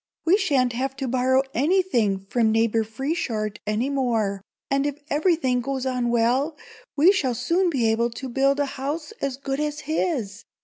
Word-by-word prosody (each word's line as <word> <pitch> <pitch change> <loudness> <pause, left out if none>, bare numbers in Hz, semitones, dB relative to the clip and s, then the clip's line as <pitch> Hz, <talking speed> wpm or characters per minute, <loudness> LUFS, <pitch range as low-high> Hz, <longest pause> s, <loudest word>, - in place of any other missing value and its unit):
We 340 +3 +5
sha'n't 275 - +1
have 265 +3 -2
to 270 -1 -4
borrow 260 +1 +2
anything 245 - +1
from 220 +2 +1
Neighbor 225 0 +2
Frieshardt 220 -3 -3
any 215 +5 0
more, 230 -8 0 0.3
and 275 +1 +2
if 290 -1 -4
everything 295 -5 +2
goes 265 +1 -3
on 250 -2 0
well, 245 +6 +1 0.4
we 325 +7 +7
shall 270 -12 0
soon 340 +10 +1
be 265 -8 0
able 235 +2 +1
to 250 +3 -7
build 275 +3 +1
a 285 - +2 0.2
house 300 +6 -3
as 270 -2 -2
good 275 0 -3
as 300 0 -2
his. 270 - -2
265 Hz, 170 wpm, -24 LUFS, 235-290 Hz, 0.4 s, we